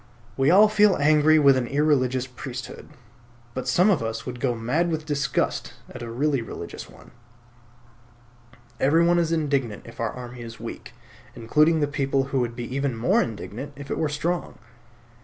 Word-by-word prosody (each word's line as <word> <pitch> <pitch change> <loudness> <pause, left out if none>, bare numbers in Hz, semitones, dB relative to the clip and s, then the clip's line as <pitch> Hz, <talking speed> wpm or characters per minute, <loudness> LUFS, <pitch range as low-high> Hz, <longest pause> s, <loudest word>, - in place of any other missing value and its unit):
We 135 +1 +2
all 200 +5 +7
feel 210 -2 +4
angry 155 +1 +5
with 140 -3 +6
an 125 -2 -1
irreligious 130 -3 +1
priesthood; 125 -1 -8 0.6
but 130 0 -5
some 180 +11 +4
of 185 - +1
us 115 0 -4
would 125 -1 -6
go 120 0 0
mad 130 +10 0
with 155 -2 -3
disgust 140 -3 -1 0.2
at - - -8
a 120 - -6
really 135 +3 0
religious 115 - -8
one. - - -17 1.7
Everyone 170 +5 +4
is 165 -1 0
indignant 140 -9 -1
if 115 - -13
our 115 - 0
army 125 -1 -9
is 115 -1 -9
weak, - - -8 0.4
including 150 +7 +2
the 145 - +2
people 140 -1 0
who 135 - +2
would 120 -1 -2
be 120 0 -5
even 140 -4 -1
more 115 - +3
indignant 120 +5 -6
if 140 0 -9
it - - -2
were 155 -2 0
strong. 165 +4 -3
140 Hz, 170 wpm, -24 LUFS, 120-155 Hz, 1.7 s, all